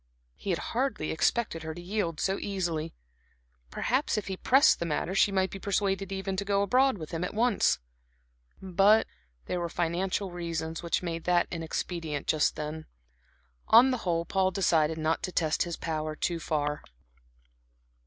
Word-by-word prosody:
He 200 - -7
had 175 - +2 0.2
hardly 250 - -1
expected 165 +1 0
her 160 0 -5
to - - -8
yield 175 -3 -2
so 195 0 0
easily; 170 -5 -3 0.7
perhaps 260 - 0
if 210 - -2
he 190 - -3
pressed 270 +9 +4
the 170 - -2
matter 165 +4 -1
she 200 +1 +4
might 190 -1 +1
be 195 - -7
persuaded 195 -1 -1
even 195 0 -3
to 200 - 0
go 200 0 +1
abroad 255 +4 +3
with 155 -3 -8
him 165 0 -3
at 180 - -4
once. 235 -1 +3 0.8
But 195 +4 +4 0.4
there 180 - -2
were 170 -1 -2
financial 180 +3 -1
reasons 165 -2 -4
which 170 +1 -1
made 165 -2 -4
that 175 -1 +3
inexpedient 165 -2 -3
just 155 -2 +2
then. 155 +1 -5 0.8
On 245 +4 +7
the 255 - 0
whole, 170 -3 -1
Paul 190 +1 +1
decided 165 -4 +2
not 160 +1 0
to 185 - -3
test 160 -3 0
his 170 -1 -1
power 155 -1 -3
too 170 +2 -1
far. 150 -2 -1
175 Hz, 165 wpm, -29 LUFS, 160-195 Hz, 0.8 s, On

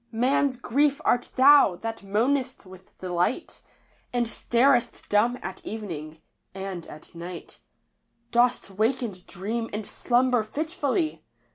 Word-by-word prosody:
Man's 255 +3 +1
Grief 280 +4 +1
art 245 0 +2
thou, 270 -7 +7
that 225 +4 -5
moanest 245 +6 0
with 185 0 -15
the 180 -1 -6
light, 180 - -1 0.5
And 245 -1 +1
starest 240 +2 +1
dumb 230 +4 +3
at 190 - -7
evening 160 -8 -7
— - - -50
and 190 -3 -6
at 155 - -12
night 170 +1 -9 0.7
Dost 240 -3 +2
wake 225 +6 +1
and 190 -6 -6
dream 225 +5 -4
and 210 0 -4
slumber 250 -1 +2
fitfully 310 - -2
230 Hz, 130 wpm, -26 LUFS, 190-255 Hz, 0.7 s, thou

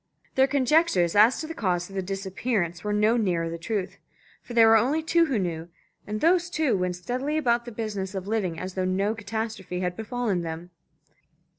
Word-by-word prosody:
Their 265 0 +4
conjectures 270 - +2
as 220 +5 +5
to - - -4
the 325 - -6
cause 180 - -1
of 195 - -12
the 190 - 0
disappearance 190 -1 -2
were 210 - -2
no 210 +3 +3
nearer 180 -7 0
to 165 - -4
the 170 - -6
truth. 200 +1 -3 0.4
For 240 - -9
there 230 -1 +7
were 225 - +7
only 270 +9 +2
two 335 +1 +3
who 265 -6 0
knew, 170 -3 -3 0.4
and 215 +1 -4
those 350 +1 +3
two 310 -8 +1
went 180 -1 -1
steadily 255 - -2
about 240 -5 +1
the 240 - -7
business 205 -4 -4
of 190 -1 -4
living 195 -7 -1
as 185 0 -5
though 185 - -1
no 195 +3 0
catastrophe 220 -4 -4
had 180 -1 -2
befallen 220 -4 -2
them. 165 +1 -6
210 Hz, 200 wpm, -26 LUFS, 180-245 Hz, 0.4 s, there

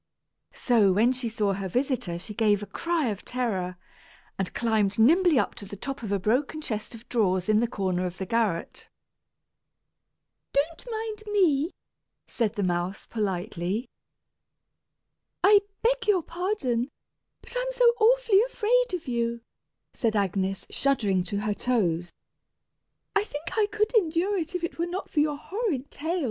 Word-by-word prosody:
So 225 -6 +4
when 220 +6 +4
she 250 -2 -2
saw 210 -3 0
her 195 0 -3
visitor 245 -7 -1
she 210 +5 -7
gave 205 -2 +2
a - - -4
cry 335 +1 -1
of 205 -2 -5
terror, 190 -8 -2 0.6
and 195 -1 -2
climbed 220 -4 +1
nimbly 325 +7 +5
up - - +1
to - - -7
the 200 - -7
top 270 +7 -5
of 215 -3 -5
a 200 - +2
broken 250 - 0
chest 220 -6 -4
of 230 +1 -14
drawers 190 -6 +1
in 215 0 +4
the 235 - +2
corner 185 -4 -1
of 175 0 -8
the 190 - -3
garret. 210 -5 -1 1.6
"Don't 315 - -1
mind 440 -1 -4
me," 330 -7 +3 0.6
said 225 -3 -1
the 205 - -1
mouse, 180 +2 -1
politely. 190 0 -2 1.6
"I 410 +1 +8 0.2
beg 475 0 +1
your 380 -5 +3
pardon, 325 - -1 0.5
but 480 - -5
I'm - - -1
so - - +2
awfully 460 -3 +5
afraid - - +1
of 335 -5 -7
you," 235 -1 -1 0.5
said 225 -3 0
Agnes, 195 -1 0
shuddering 210 -10 +1
to 200 +1 -2
her 210 0 0
toes. 175 -8 0 1.0
"I 410 - +4
think 305 -6 -6
I 430 -2 +3
could 425 +1 0
endure 375 -1 +2
you 330 - -1
if 360 -2 -3
it 335 - -4
were 340 - +1
not 365 +3 -5
for 305 - +1
your 295 -1 +2
horrid 355 - -3
tail! 335 +5 -2
245 Hz, 155 wpm, -27 LUFS, -, 1.6 s, I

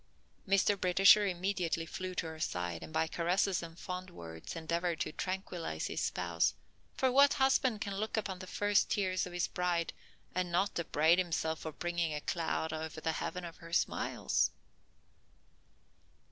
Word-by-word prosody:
Mr. 195 0 +3
Britisher 195 +3 +6
immediately 180 -3 -1
flew 185 +2 -5
to - - -1
her 160 -1 -7
side, 90 - -2
and - - -9
by 160 +1 +2
caresses 180 +3 +1
and 165 0 -9
fond 185 0 -5
words 80 - -8
endeavored 170 +1 -1
to - - -1
tranquillize 180 - -3
his - - -2
spouse, 85 -2 0 0.4
for 260 -1 +2
what 280 +2 +6
husband 265 -5 +3
can 200 - -2
look 215 +3 -2
upon 195 -4 -2
the 185 - -8
first 205 +2 +2
tears 185 -2 0
of 180 - -10
his 175 0 0
bride 175 -2 -1 0.4
and 180 -1 -1
not 185 +2 +1
upbraid 165 +1 +3
himself 160 -3 -1
for 160 - -5
bringing 170 -1 -1
a 150 - -3
cloud 160 -1 -1
over 160 0 -5
the 160 +1 0
heaven 180 +2 -4
of 170 - -9
her 165 0 -12
smiles? 170 - +1
175 Hz, 160 wpm, -33 LUFS, 160-190 Hz, 0.4 s, Britisher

